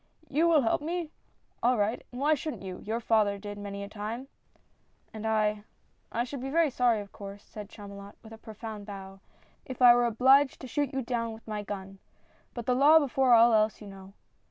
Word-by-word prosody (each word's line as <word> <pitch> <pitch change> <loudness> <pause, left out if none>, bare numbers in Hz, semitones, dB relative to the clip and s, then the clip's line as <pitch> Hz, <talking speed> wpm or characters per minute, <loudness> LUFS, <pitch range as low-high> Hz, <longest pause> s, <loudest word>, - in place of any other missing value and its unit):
"You 320 +5 +2
will 315 -5 +4
help 225 - +1
me! 330 0 -3 0.5
all 245 +1 +3
right, 210 +3 -1
and 245 - -8
why 300 +2 +4
shouldn't 305 -5 -4
you? 185 -1 -7
your 225 +2 -3
father 215 -3 +2
did 205 0 -8
many 200 0 -6
a - - -6
time 220 +5 -6
I - - -39
" - - -42
" - - -40
And 220 0 -5
I 215 -1 +1 0.2
— - - -42
I 235 - 0
should 255 +1 -7
be 265 - -4
very 320 0 +2
sorry, 240 -3 +2
of 200 - -12
course," 200 0 -10
said 210 -1 -10
Chamulot, 200 -1 -11
with 220 0 -12
a 220 - -12
profound 220 -1 -8
bow, 195 -1 -9 0.2
— - - -33 0.2
if 260 - -7
I 245 -1 +9
were 240 0 +3
obliged 265 +4 +4
to 260 - -7
shoot 285 +2 -1
you 265 -2 -2
down 230 -2 -2
with 220 +1 -14
my 210 -1 -3
gun 195 -1 -7 0.3
— - - -35
but 240 -2 -5
the 250 - +2
Law 285 +5 +6
before 265 -4 +4
all 230 +1 +6
else 215 0 +2
you 210 - -11
know." 195 -1 -12
225 Hz, 230 wpm, -29 LUFS, 205-260 Hz, 0.5 s, I